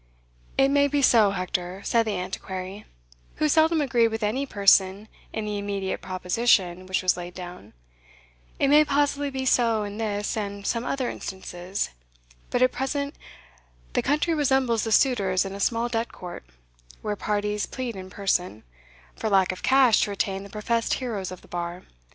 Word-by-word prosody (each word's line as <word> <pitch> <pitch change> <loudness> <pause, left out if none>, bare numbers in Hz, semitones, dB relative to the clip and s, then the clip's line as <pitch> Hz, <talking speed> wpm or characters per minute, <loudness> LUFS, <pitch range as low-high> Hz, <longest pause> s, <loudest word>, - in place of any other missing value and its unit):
"It 270 0 +5
may 285 0 +4
be 285 0 0
so, 225 -5 +6
Hector," 185 0 -3
said 230 -1 +2
the 210 - -1
Antiquary, 185 +2 -6 0.5
who 310 - +1
seldom 315 +1 +4
agreed 240 -4 +3
with 225 0 -4
any 255 +7 0
person 200 -1 +3 0.2
in 220 - -3
the 210 -1 -2
immediate 200 -1 -3
proposition 185 -1 +1
which 185 0 0
was 185 0 +3
laid 175 0 -7
down 180 - -9 0.8
"it 275 - +2
may 300 +2 +7
possibly 285 0 +1
be 265 -1 -4
so 230 -4 +3
in 205 +1 -6
this 205 -2 -2
and 200 -2 -4
some 230 +2 -1
other 260 -1 -1
instances; 190 -2 -4 0.6
but 245 - +2
at 255 - +4
present 280 +2 -2 0.8
the - - +2
country 300 +4 +1
resembles 265 -6 +2
the 225 - -2
suitors 200 -7 +3
in 195 - -5
a 200 - -7
small 230 +3 +1
debt 230 -1 -2
court, 175 - -9 0.6
where 210 -1 -1
parties 210 0 -1
plead 250 -4 -5
in 185 -1 -8
person, 180 - -1 0.5
for 220 - -2
lack 190 -2 +4
of 185 - -8
cash 260 -4 +5
to - - +1
retain 195 -1 -2
the 200 - -10
professed 230 +3 0
heroes 220 -8 -4
of 185 -1 -9
the - - -17
bar. 175 +1 -5
210 Hz, 170 wpm, -25 LUFS, 190-255 Hz, 0.8 s, may